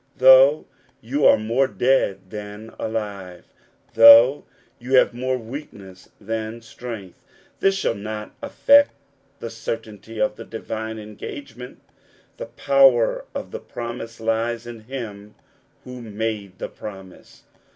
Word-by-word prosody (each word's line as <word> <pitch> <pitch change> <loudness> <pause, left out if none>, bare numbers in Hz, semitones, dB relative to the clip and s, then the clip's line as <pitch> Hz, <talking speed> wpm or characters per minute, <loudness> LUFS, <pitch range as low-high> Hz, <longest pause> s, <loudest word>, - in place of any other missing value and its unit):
Though 130 +3 +7 0.3
you 140 +5 +1
are - - +6
more 115 +5 +1
dead 100 -8 0
than 105 +1 -9
alive, 100 -5 -5 0.5
though 115 +4 +8 0.3
you 125 +2 -6
have 125 - +4
more 130 +1 -2
weakness 110 -7 -10
than 110 +2 -5
strength, 115 -5 -9 0.4
this 195 0 +2
shall 195 - 0
not 105 0 -7
affect 285 0 +4 0.5
the 115 - -6
certainty 115 -1 -7
of 105 0 0
the 115 - -8
divine 110 0 -6
engagement. 120 +4 -10 0.5
The - - -7
power 135 -4 +3
of - - -6
the - - -6
promise 120 -1 -7
lies 115 +1 -1
in 120 -1 -9
him 105 -5 -8 0.5
who 125 -1 -9
made 105 -3 -5
the - - -5
promise. 95 -3 -12
115 Hz, 120 wpm, -22 LUFS, 105-125 Hz, 0.5 s, though